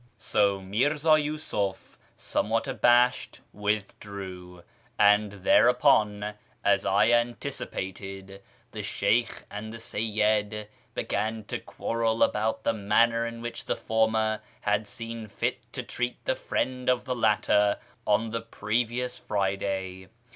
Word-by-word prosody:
" 120 - -39 0.2
So 100 -1 +3
Mirza 145 +11 0
Yiisuf, 150 -11 0 0.2
somewhat 115 +2 -1
abashed, 125 +1 +3
withdrew; 100 -3 -4 0.3
and 105 0 +5
there 100 +3 +4
upon, 105 -5 +3 0.3
as 100 -1 +3
I 105 +4 +4
anticipated, 100 -5 -3 0.3
the - - -5
Sheykh 110 +4 0
and 105 +2 -6
the 115 - -7
Seyyid 105 -1 0 0.3
began 110 +2 -2
to - - -4
quarrel 115 -1 0
about 110 +1 0
the 115 - +2
manner 115 +2 +2
in 115 0 -7
which 120 - -6
the - - 0
former 110 -1 +1 0.2
had 105 +1 0
seen 115 -1 -6
fit 100 - -3
to - - -4
treat 125 0 -3
the - - +2
friend 130 - -2
of 125 -1 +2
the 130 -1 -2
latter 105 -2 +3 0.3
on 110 +2 +2
the 115 0 -2
previous 120 +3 -2
Friday. 95 -2 -2
110 Hz, 125 wpm, -27 LUFS, 100-120 Hz, 0.3 s, and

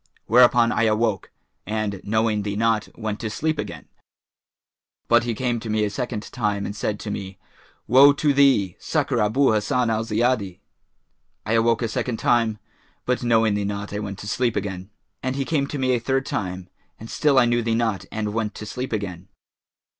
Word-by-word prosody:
Whereupon 120 0 +5
I 115 - +1
awoke 110 -3 0 0.3
and, 105 -3 -3
knowing 110 0 +1
thee 100 0 -3
not, 110 0 +1
went 110 -2 -4
to 110 - -3
sleep 155 +7 -2
again; - - -6 1.2
but 120 0 +4
he 120 -2 -2
came 120 0 -1
to 110 0 -7
me 110 0 +1
a 105 - -3
second 120 -1 -4
time 100 -1 -1
and 100 - -5
said 105 0 -2
to 105 - -5
me, 95 -1 -6 0.5
'Woe 135 +5 +7
to 145 0 +1
thee! 135 -10 +3
Succour 140 -6 -1
Abu 120 +6 +3
Hassan 115 +2 +1
al 110 0 0
Ziyadi.' 110 -4 0 0.9
I 110 - -1
awoke 115 +1 +2
a - - +1
second 115 +1 -2
time, 115 -3 +2 0.5
but 125 0 0
knowing 115 -3 +3
thee 105 0 -1
not 100 0 -4
I 105 - -2
went 100 -2 -5
to 105 - -8
sleep 120 +2 0
again; 95 -1 -4 0.3
and 130 +1 -2
he 135 0 -2
came 140 -3 0
to 145 - -5
me 130 -1 +1
a 120 - +1
third 135 +3 -1
time 90 -2 -4 0.3
and 110 - -9
still 145 +3 +1
I 120 - +6
knew 120 0 +1
thee 115 -1 0
not 110 -5 -1
and 105 -1 -3
went 110 -1 -2
to 105 - -7
sleep 125 +4 -5
again. 95 -4 -4
110 Hz, 190 wpm, -23 LUFS, 105-125 Hz, 1.2 s, Woe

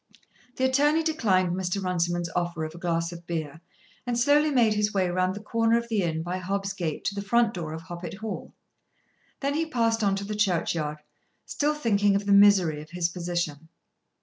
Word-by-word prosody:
The 260 - -2
attorney 295 +5 +3
declined 200 - +1
Mr. 185 +1 -2
Runciman's 175 -2 -1
offer 175 -2 -1
of 155 - -7
a 170 - -10
glass 170 -1 -1
of 170 0 -11
beer 160 -2 -4 0.5
and 240 -1 0
slowly 290 +5 +4
made 240 -6 +3
his 210 0 +1
way 190 -2 +2
round 185 +1 0
the 205 - -8
corner 230 +1 +2
of 235 0 -4
the 215 -3 +1
inn 160 -2 -1
by 180 +2 -3
Hobb's 195 +1 -2
gate 170 -6 -4
to - - 0
the 200 - -4
front 230 +2 +2
door 165 -4 -5
of 160 +1 -7
Hoppet 175 -1 -7
Hall. 220 +1 -6 0.9
Then 280 0 0
he 320 +2 -1
passed 230 -6 +1
on 200 -1 +2
to 195 - -4
the 210 +1 -4
churchyard, 165 -7 -1 0.4
still 295 +1 0
thinking 205 -7 +2
of 200 +1 -1
the 200 - +1
misery 195 -6 +5
of 155 - -13
his 175 0 -1
position. 170 -3 -3
195 Hz, 200 wpm, -26 LUFS, 170-225 Hz, 0.9 s, misery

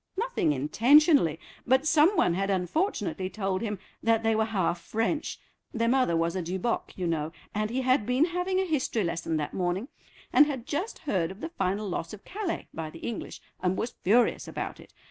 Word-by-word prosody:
"Nothing 480 - +1
intentionally, 225 - +4 0.3
but 260 +3 +4
some 320 +5 +4
one 175 - +3
had 195 +3 -1
unfortunately 190 - -1
told 195 -2 -2
him 210 -3 -2 0.2
that 225 0 +2
they 225 0 +2
were 220 0 +2
half 185 -5 -1
French—their 230 -1 -3
mother 250 -9 +3
was 165 +2 0
a 185 - -1
Duboc, 185 +7 -2
you 185 - -2
know—and 165 +6 -3
he 255 +3 -1
had 255 -4 +2
been 255 +5 +3
having 360 +2 -1
a 380 - +1
history 270 - 0
lesson 165 -2 -1
that 150 -1 -3
morning, 185 +7 -1 0.4
and 290 - +7
had 265 -5 -4
just 315 +9 -3
heard 185 - -1
of 190 +2 -10
the 325 - -5
final 205 - -1
loss 170 -1 -4
of 210 - -11
Calais 395 -3 -4
by 160 -1 -4
the 165 - -11
English, 230 - -5 0.2
and 185 0 +1
was 235 - -2
furious 235 +6 +3
about - - -5
it. - - -15
220 Hz, 185 wpm, -28 LUFS, 180-285 Hz, 0.4 s, and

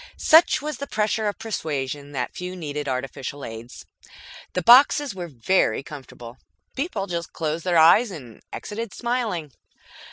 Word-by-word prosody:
Such 320 -2 +5
was 300 -3 -4
the 280 - -6
pressure 215 0 0
of 205 - -2
persuasion 145 - -4
that 125 -3 -3
few 180 +1 -6
needed 150 -4 -5
artificial 130 +2 -4
aids. 115 +2 -9 0.7
The 180 - -1
boxes 270 - +6
were 180 -2 -6
very 140 -2 +1
comfortable. 130 -4 -11 0.4
People 265 - -2
just 170 -3 -5
closed 160 +1 -3
their 175 -2 +2
eyes 170 +9 +6
and 130 - -10
exited 225 0 -6
smiling. 230 - -2
170 Hz, 140 wpm, -23 LUFS, 140-220 Hz, 0.7 s, boxes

